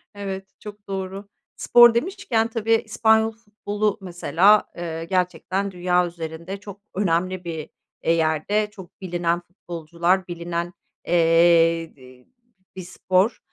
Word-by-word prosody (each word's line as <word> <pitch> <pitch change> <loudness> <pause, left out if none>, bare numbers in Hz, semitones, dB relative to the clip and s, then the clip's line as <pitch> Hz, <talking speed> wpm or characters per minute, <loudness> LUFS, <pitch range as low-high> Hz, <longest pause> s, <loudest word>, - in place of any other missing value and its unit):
Evet, 195 -1 -5
çok 205 -1 -11
doğru. 195 +1 -5 0.3
Spor 240 -1 +6
demişken 245 - 0
tabii 225 0 0
İspanyol 220 0 +2
futbolu 210 -2 -3
mesela, 190 +3 +3
eee, 165 -1 -5
gerçekten 190 +2 -1
dünya 180 0 +1
üzerinde 170 +2 -7
çok 200 -1 -11
önemli 185 -1 0
bir, 160 -3 -6 0.3
eee, 165 - +2
yerde, 165 +6 0
çok 190 -3 -14
bilinen 175 -2 -1
futbolcular, 175 0 -2
bilinen, 170 0 -4 0.3
eee, 165 -1 +4
dı 130 -1 -17 0.5
bir 185 - -6
spor. 185 +4 0
185 Hz, 115 wpm, -23 LUFS, 170-205 Hz, 0.5 s, Spor